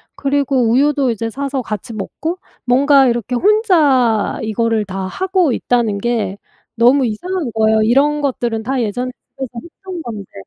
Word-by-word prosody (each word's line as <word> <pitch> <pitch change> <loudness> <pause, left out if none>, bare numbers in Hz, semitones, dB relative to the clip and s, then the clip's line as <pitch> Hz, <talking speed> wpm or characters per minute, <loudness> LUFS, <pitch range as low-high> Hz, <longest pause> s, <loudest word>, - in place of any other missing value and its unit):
그리고 275 -4 +1
우유도 275 0 +2
이제 230 0 -3
사서 275 +1 -3
같이 215 +2 -5
먹고 315 - -4 0.3
뭔가 270 +2 +4
이렇게 240 +1 -2
혼자 295 - +3
이거를 220 0 0
다 195 0 -5
하고 370 - 0
있다는 235 -4 0
게 215 -2 -2 0.4
너무 250 +3 +4
이상한 305 - -3
거예요 220 0 +3
이런 280 +6 +2
것들은 240 -5 -2
다 260 +1 -1
예전에 245 +4 -2 0.2
집에서 265 -3 -5
했던 360 +1 -9
건데 215 - -8
250 Hz, 315 characters per minute, -17 LUFS, 225-285 Hz, 0.4 s, 뭔가